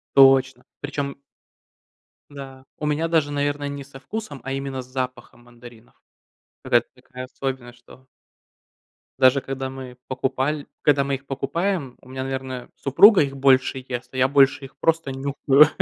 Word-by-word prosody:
Точно! 135 Hz, -1 st, +5 dB, 0.2 s
Причем. 145 Hz, -1 st, -4 dB, 1.1 s
Да, 135 Hz, -2 st, -10 dB
у 150 Hz, -, -3 dB
меня 150 Hz, +2 st, 0 dB
даже, 155 Hz, -3 st, +1 dB
наверно, 145 Hz, 0 st, -1 dB
не 140 Hz, -1 st, -6 dB
со 135 Hz, -1 st, -13 dB
вкусом, 150 Hz, -4 st, -6 dB
а 135 Hz, -, -3 dB
именно 135 Hz, -1 st, -4 dB
с -, -, -15 dB
запахом 125 Hz, -2 st, -6 dB
мандаринов. 120 Hz, -1 st, -16 dB, 0.7 s
Какая-то -, -, +2 dB
такая 130 Hz, 0 st, -9 dB
особенность, 130 Hz, -2 st, -6 dB
что 130 Hz, +2 st, -18 dB, 1.1 s
даже 130 Hz, +1 st, +5 dB
когда 135 Hz, 0 st, -5 dB
мы 130 Hz, -2 st, -9 dB
покупаль 135 Hz, +3 st, -1 dB, 0.2 s
когда 145 Hz, -2 st, +3 dB
мы 140 Hz, -, -1 dB
их 135 Hz, +1 st, -7 dB
покупаем, 140 Hz, +1 st, -2 dB
у -, -, -18 dB
меня, 130 Hz, 0 st, -5 dB
наверное, 130 Hz, -2 st, -5 dB
супруга 190 Hz, -, +6 dB
их 140 Hz, -1 st, -3 dB
больше 130 Hz, -1 st, +3 dB
ест, 125 Hz, 0 st, -5 dB
а -, -, -8 dB
я 130 Hz, 0 st, +3 dB
больше 140 Hz, 0 st, +4 dB
их 135 Hz, -, -12 dB
просто 165 Hz, -4 st, +1 dB
нюхаю. 140 Hz, +2 st, +4 dB
135 Hz, 150 wpm, -23 LUFS, 130-145 Hz, 1.1 s, супруга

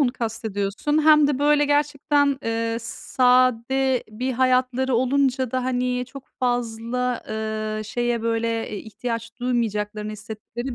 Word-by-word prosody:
onu 255 Hz, -4 st, +3 dB
kastediyorsun? 225 Hz, +5 st, -1 dB
Hem 305 Hz, -1 st, +7 dB
de, 285 Hz, -2 st, 0 dB
böyle, 295 Hz, 0 st, +4 dB
gerçekten, 290 Hz, 0 st, +2 dB, 0.2 s
eee, 230 Hz, 0 st, -1 dB
s 230 Hz, -, -8 dB
sade 255 Hz, +1 st, +3 dB
bir 250 Hz, +5 st, -3 dB
hayatları 255 Hz, +1 st, +2 dB
olunca 260 Hz, 0 st, +1 dB
da, 255 Hz, 0 st, -1 dB
hani, 250 Hz, -1 st, 0 dB
çok 270 Hz, +1 st, -12 dB
fazla, 245 Hz, 0 st, -1 dB
ııı, 215 Hz, 0 st, -3 dB
şeye, 240 Hz, +1 st, -1 dB
böyle, 230 Hz, 0 st, -1 dB
eee, 210 Hz, -, -4 dB
ihtiyaç 230 Hz, +1 st, -5 dB
duymayacaklarını 215 Hz, -3 st, -1 dB
hissettikleri 220 Hz, +4 st, -7 dB
245 Hz, 130 wpm, -23 LUFS, 225-260 Hz, 0.2 s, Hem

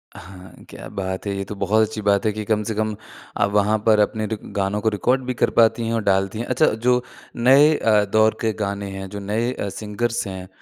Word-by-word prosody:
हाँ। 95 Hz, 0 st, -12 dB, 0.2 s
क्या -, -, -10 dB
बात 95 Hz, 0 st, -4 dB
है, 100 Hz, -, -1 dB
ये 100 Hz, -, -2 dB
तो 105 Hz, -, -7 dB
बहुत 105 Hz, +2 st, +2 dB
अच्छी 110 Hz, 0 st, -6 dB
बात 100 Hz, 0 st, +2 dB
है 110 Hz, -, +2 dB
कि 110 Hz, 0 st, -4 dB
कम 110 Hz, 0 st, +1 dB
से 110 Hz, +1 st, -3 dB
कम 110 Hz, 0 st, -1 dB, 0.4 s
आप 100 Hz, -, +2 dB
वहाँ 105 Hz, +1 st, +2 dB
पर 110 Hz, -1 st, +5 dB
अपने 110 Hz, +1 st, +1 dB
रिक 110 Hz, -1 st, -4 dB, 0.2 s
गानों 100 Hz, +1 st, 0 dB
को 110 Hz, -, +2 dB
रिकॉर्ड 125 Hz, +6 st, 0 dB
भी 125 Hz, -, -2 dB
कर -, -, +1 dB
पाती 115 Hz, 0 st, +4 dB
हैं 115 Hz, -, -1 dB
और 115 Hz, -2 st, -1 dB
डालती 95 Hz, +2 st, 0 dB
हैं। 120 Hz, -, -3 dB
अच्छा 130 Hz, +5 st, +2 dB
जो 125 Hz, +3 st, +1 dB, 0.3 s
नए 135 Hz, +6 st, +5 dB
अ, 105 Hz, -2 st, +3 dB
दौर 110 Hz, +2 st, +2 dB
के 110 Hz, -2 st, 0 dB
गाने 100 Hz, 0 st, -4 dB
हैं 95 Hz, 0 st, -6 dB
जो 100 Hz, -, -7 dB
नए 110 Hz, +5 st, -1 dB
अ, 100 Hz, -, -4 dB
सिंगर्स 110 Hz, +3 st, -3 dB
हैं, 95 Hz, -1 st, -7 dB
105 Hz, 235 wpm, -21 LUFS, 100-115 Hz, 0.4 s, पर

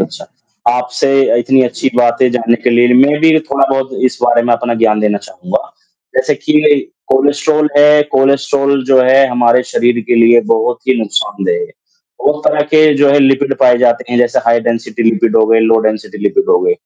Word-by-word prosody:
अच्छा। -, -, -6 dB, 0.5 s
आपसे 125 Hz, +1 st, 0 dB
इतनी 130 Hz, +2 st, +1 dB
अच्छी 130 Hz, +1 st, -2 dB
बातें 120 Hz, +1 st, +1 dB
जानने 115 Hz, -1 st, 0 dB
के -, -, +1 dB
लिए 120 Hz, +1 st, +2 dB
मैं 140 Hz, +3 st, +3 dB
भी 160 Hz, 0 st, +3 dB
थोड़ा-बहुत 135 Hz, -2 st, -2 dB, 0.2 s
इस -, -, -13 dB
बारे 120 Hz, -1 st, +2 dB
में 120 Hz, -, 0 dB
अपना 120 Hz, 0 st, -3 dB
ज्ञान 105 Hz, -1 st, +2 dB
देना 105 Hz, -1 st, -1 dB
चाहूँगा, 180 Hz, 0 st, -6 dB, 0.6 s
जैसे -, -, 0 dB
कि 310 Hz, -, -4 dB, 0.6 s
कोलेस्ट्रॉल 145 Hz, +3 st, 0 dB
है, 150 Hz, 0 st, +5 dB
कोलेस्ट्रॉल 140 Hz, 0 st, 0 dB
जो 130 Hz, -1 st, +5 dB
है 135 Hz, +2 st, +3 dB
हमारे 120 Hz, 0 st, +1 dB
शरीर 120 Hz, 0 st, 0 dB
के -, -, 0 dB
लिए 115 Hz, 0 st, +4 dB
बहुत 115 Hz, +2 st, -2 dB
ही 130 Hz, -, +2 dB
नुकसानदेह 110 Hz, -, -3 dB
है, 440 Hz, -, -5 dB, 0.6 s
वो 150 Hz, -, +2 dB
एक 150 Hz, -, -13 dB
तरह 150 Hz, -, 0 dB
के 155 Hz, 0 st, +4 dB
जो 140 Hz, 0 st, +2 dB
है 145 Hz, -, +3 dB
लिपिड 135 Hz, 0 st, +1 dB
पाए 125 Hz, -1 st, +4 dB
जाते 120 Hz, -1 st, 0 dB
हैं, 120 Hz, -, -1 dB
जैसे 120 Hz, 0 st, +1 dB
हाई 115 Hz, 0 st, +2 dB
डेंसिटी 115 Hz, 0 st, -5 dB
लिपिड 110 Hz, 0 st, -1 dB
हो 110 Hz, -, +3 dB
गए, 115 Hz, 0 st, +2 dB
लो 115 Hz, 0 st, +2 dB
डेंसिटी 110 Hz, -1 st, -5 dB
लिपिड 400 Hz, +2 st, -1 dB
हो 450 Hz, -1 st, +2 dB
गए, 435 Hz, +3 st, 0 dB
125 Hz, 190 wpm, -12 LUFS, 120-140 Hz, 0.6 s, है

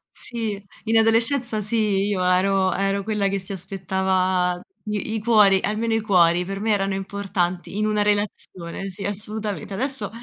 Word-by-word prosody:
Sì, 220 Hz, -4 st, -3 dB, 0.2 s
in 225 Hz, 0 st, +3 dB
adolescenza 230 Hz, +1 st, +3 dB
sì, 210 Hz, -2 st, +1 dB
io 195 Hz, -3 st, 0 dB
ero 185 Hz, +1 st, +2 dB
ero 195 Hz, 0 st, 0 dB
quella 210 Hz, -1 st, 0 dB
che 195 Hz, 0 st, -1 dB
si 185 Hz, +1 st, -8 dB
aspettava 185 Hz, -1 st, 0 dB, 0.3 s
i 210 Hz, +1 st, -3 dB
i -, -, -1 dB
cuori 210 Hz, -4 st, +5 dB
almeno 225 Hz, +2 st, -1 dB
i 225 Hz, -, +1 dB
cuori 180 Hz, -4 st, +3 dB
per 195 Hz, +1 st, -5 dB
me 220 Hz, +2 st, 0 dB
erano 195 Hz, -1 st, +1 dB
importanti 195 Hz, -2 st, -3 dB
in 215 Hz, -, +1 dB
una 210 Hz, -1 st, +1 dB
relazione, 200 Hz, -3 st, -2 dB
sì, 195 Hz, +1 st, -7 dB
assolutamente. 210 Hz, 0 st, -3 dB
Adesso 255 Hz, 0 st, -2 dB
200 Hz, 160 wpm, -23 LUFS, 190-215 Hz, 0.3 s, cuori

